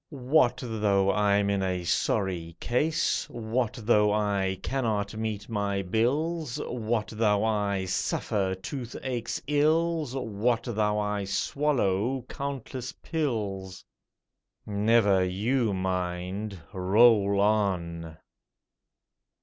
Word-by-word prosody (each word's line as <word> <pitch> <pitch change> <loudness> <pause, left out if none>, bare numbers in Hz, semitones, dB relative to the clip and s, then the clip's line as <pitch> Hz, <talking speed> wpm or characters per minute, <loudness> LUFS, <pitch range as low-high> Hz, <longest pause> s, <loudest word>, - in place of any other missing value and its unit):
What 135 -1 +2
though 100 -4 +2
I'm 100 -1 +2
in 100 -1 0
a 90 -2 -1
sorry 85 -1 -1
case? 150 +7 0
What 115 0 -2
though 105 -2 +4
I 100 -3 0
cannot 110 -6 -1
meet 110 -2 -3
my 100 -3 -1
bills? 140 - 0
What 115 -2 -2
though 105 -2 +2
I 100 -3 0
suffer 95 +1 -1
toothache's 120 +3 -4
ills? 155 -1 +1
What 115 -1 0
though 105 -3 0
I 105 -1 -1
swallow 125 0 0
countless 135 -2 -5
pills? 105 - -3 0.8
Never 105 -2 +3
you 110 +6 0
mind! 95 +1 -3
Roll 100 +1 +4
on! 90 -6 0
105 Hz, 95 wpm, -27 LUFS, 95-120 Hz, 0.8 s, though